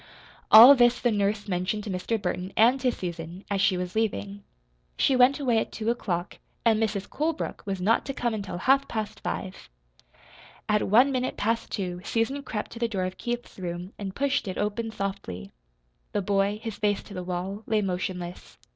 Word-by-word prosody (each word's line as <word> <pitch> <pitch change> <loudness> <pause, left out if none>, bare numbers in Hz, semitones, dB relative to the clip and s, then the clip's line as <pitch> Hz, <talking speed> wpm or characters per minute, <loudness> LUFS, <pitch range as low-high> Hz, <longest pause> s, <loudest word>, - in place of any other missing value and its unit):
All 235 +6 +11
this 240 -2 +4
the 240 - +1
nurse 205 0 0
mentioned 190 +3 -1
to 205 - -5
Mr. 190 +5 -2
Burton 185 -1 -3
and 240 +5 +5
to 250 -1 +2
Susan, 175 -1 -6
as 195 -1 +1
she 190 -2 +3
was 180 0 -4
leaving. 205 -2 -2 0.5
She 270 - +3
went 255 +3 +5
away 245 -5 +2
at - - -3
two 225 +1 -1
o'clock, 180 -7 -3 0.3
and 225 -1 +4
Mrs. 205 -2 -1
Colebrook 315 +1 -3
was 195 -1 -2
not 210 +5 +2
to 275 - -2
come 240 -2 -1
until 200 -4 -4
half 270 +8 +3
past 215 -2 -4
five. 190 - -5 1.0
At 210 0 +2
one 245 +7 +5
minute 255 -1 -2
past 230 +2 -1
two 180 -3 -3
Susan 230 +7 -1
crept 215 -6 -5
to 230 - -8
the 235 - +1
door 195 -5 -2
of 185 0 -4
Keith's 240 -3 -5
room 180 +1 -5
and 195 -2 -5
pushed 280 -4 0
it 185 - -4
open 210 +2 -2
softly. 145 - -5 0.6
The 205 - 0
boy, 200 +1 +1
his 225 -3 -5
face 205 -1 0
to 205 - -12
the 185 - -4
wall, 185 +3 -4
lay 215 -1 +1
motionless. 180 -1 -4
205 Hz, 190 wpm, -26 LUFS, 185-230 Hz, 1.0 s, All